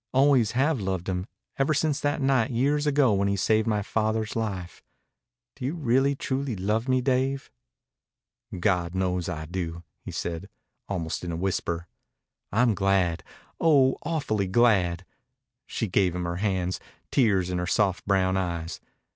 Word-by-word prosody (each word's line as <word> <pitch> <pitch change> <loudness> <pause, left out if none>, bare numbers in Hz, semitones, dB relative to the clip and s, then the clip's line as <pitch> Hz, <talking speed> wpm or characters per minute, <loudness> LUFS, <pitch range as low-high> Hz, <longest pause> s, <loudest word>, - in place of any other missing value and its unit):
Always 130 -5 +4
have 135 0 +1
loved 95 -2 -2
him, 90 0 -2 0.3
ever 140 +3 +2
since 145 0 +1
that 145 0 -1
night 135 -2 +3
years 145 +5 +1
ago 140 -5 +4
when 100 0 +1
he 100 - +1
saved 110 +3 +2
my 105 -2 +1
father's 110 +1 -1
life. 100 -6 -4 0.7
Do 135 - -9
you 140 +6 -1
really 135 -2 +2
truly 130 -2 -2
love 105 +6 -1
me, 130 0 +3
Dave?" 130 +1 0 1.1
"God 90 -2 +1
knows 90 -2 0
I 80 -1 -4
do," 85 0 -4 0.2
he - - -7
said, 85 +3 -4 0.4
almost 85 -5 -3
in 85 - -3
a - - -3
whisper. 85 -2 -2 0.7
"I'm 115 +2 +3
glad 95 -4 +1 0.4
oh, 140 -5 +4
awf'ly 110 - -1
glad." 95 -5 +3 0.6
She 115 - -2
gave 90 -1 +2
him 90 - -2
her 85 0 -3
hands, 95 -3 -1 0.3
tears 100 -8 +2
in 90 - -1
her 90 - -2
soft 95 -2 +1
brown 95 -1 +2
eyes. 85 -3 -3
100 Hz, 155 wpm, -26 LUFS, 90-130 Hz, 1.1 s, Always